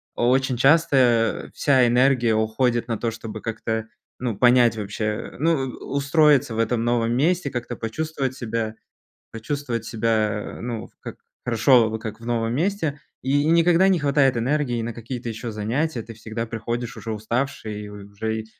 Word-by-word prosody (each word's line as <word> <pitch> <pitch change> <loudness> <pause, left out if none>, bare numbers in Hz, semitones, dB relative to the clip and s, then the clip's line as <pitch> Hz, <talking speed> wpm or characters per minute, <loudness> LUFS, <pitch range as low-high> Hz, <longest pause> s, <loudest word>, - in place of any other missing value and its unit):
о 120 - +2
очень 130 -1 +2
часто, 130 -5 +3
а, - - -18
вся 130 -3 +4
энергия 125 -1 +3
уходит 115 +2 +1
на 115 - -1
то, 115 - -1
чтобы 110 -1 -7
как-то, 110 0 -3 0.3
ну, 120 -3 -2
понять 120 0 +5
вообще, 105 +1 -3
ну, 165 +3 +3
у 130 - -7
устроиться 140 -4 +3
в - - -3
этом 115 +1 +1
новом 120 -1 +1
месте, 165 +1 +1
как-то 120 0 -4
почувствовать 135 +2 -3
себя 115 -3 -3 0.6
почувствовать 115 0 -3
себя, 110 -2 -1
ну, 115 -2 -5
как - - -8 0.3
хорошо, 115 -2 +3
как 110 0 -7
в - - -12
новом 115 -1 0
месте. 160 -2 -1 0.2
И 140 +2 +1
никогда 170 +3 +4
не 190 -2 +3
хватает 140 -3 +3
энергии 125 -1 0
на 115 0 -4
какие-то 120 +1 -6
ещё 115 +1 -5
занятия, 115 +6 -1
ты 115 +1 -10
всегда 115 +1 -5
приходишь 115 +1 -4
уже 115 - -5
уставший, 110 -1 -3
и - - -8
уже 105 +2 -5
и - - -17
120 Hz, 160 wpm, -23 LUFS, 110-135 Hz, 0.6 s, понять